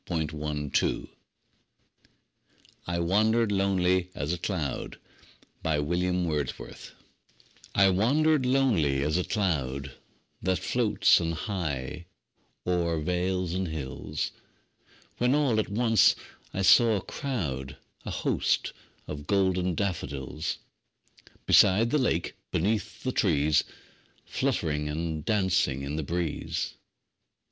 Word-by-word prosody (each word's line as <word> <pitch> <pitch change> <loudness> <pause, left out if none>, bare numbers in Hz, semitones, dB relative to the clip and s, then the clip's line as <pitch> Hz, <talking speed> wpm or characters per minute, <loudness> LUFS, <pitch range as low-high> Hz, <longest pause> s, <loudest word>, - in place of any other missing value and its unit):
William 80 -3 -1
Wordsworth 75 -1 -1 1.8
I 85 0 -1
Wandered 105 +6 +2
Lonely 95 -2 +2
As 70 +4 -2
a 90 - -3
Cloud 80 -7 -3 0.7
I 80 -2 +1 2.1
WANDERED 140 +9 +3
lonely 100 - +2
as 75 +3 +1
a - - 0
cloud 70 -10 -1 0.5
That 95 +1 +1
floats 100 -1 +3
on 85 0 -1
high 80 -3 -4 0.6
o'er 85 -2 +1
vales 90 +2 -1
and 95 0 -1
hills, 75 -1 -4 0.9
When 125 +3 +3
all 135 -7 +2
at 110 - -1
once 115 0 +4 0.4
I 95 - -2
saw 115 +3 +6
a 100 - -1
crowd, 70 - -4 0.3
A - - -6
host, - - 0 0.3
of 75 -1 -7
golden 95 -3 +1
daffodils; 75 -4 -3 0.9
Beside 110 +5 +5
the 150 - +3
lake, 90 -10 0
beneath 105 +5 -1
the 130 - 0
trees, 75 - +2 0.6
Fluttering 75 -1 -1
and 80 0 -3
dancing 95 -10 +1
in 70 +2 -3
the 80 - -1
breeze. 85 +1 -2
90 Hz, 100 wpm, -28 LUFS, 75-105 Hz, 2.1 s, saw